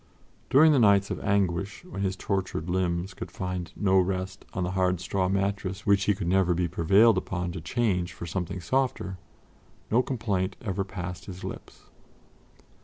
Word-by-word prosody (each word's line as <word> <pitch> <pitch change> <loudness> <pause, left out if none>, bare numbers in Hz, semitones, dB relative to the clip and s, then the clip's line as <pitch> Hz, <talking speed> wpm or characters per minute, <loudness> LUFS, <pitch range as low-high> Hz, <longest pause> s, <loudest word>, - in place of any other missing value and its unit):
During 155 +4 +7
the 140 - +4
nights 100 -3 +4
of - - -3
anguish, 100 - 0
when 175 - -6
his 95 -1 0
tortured 95 -5 -2
limbs 90 0 -1
could - - -7
find 90 -2 -4
no 95 -2 +3
rest 95 +1 -2
on 90 - -2
the 90 - -1
hard 90 -1 +1
straw 95 +1 -1
mattress 100 -1 -1
which 100 -1 +3
he 105 - +3
could 95 -2 -4
never 90 -1 +3
be 90 0 +1
prevailed 95 +6 +4
upon 90 -2 -3
to 85 -1 -6
change 90 -3 0
for 85 - -8
something 90 +1 -3
softer, 110 -4 -1 0.7
no 120 +3 +5
complaint 105 -8 -1
ever 100 -2 -2
passed 90 -2 -6
his 95 -2 -9
lips. - - -8
95 Hz, 170 wpm, -27 LUFS, 90-100 Hz, 0.7 s, During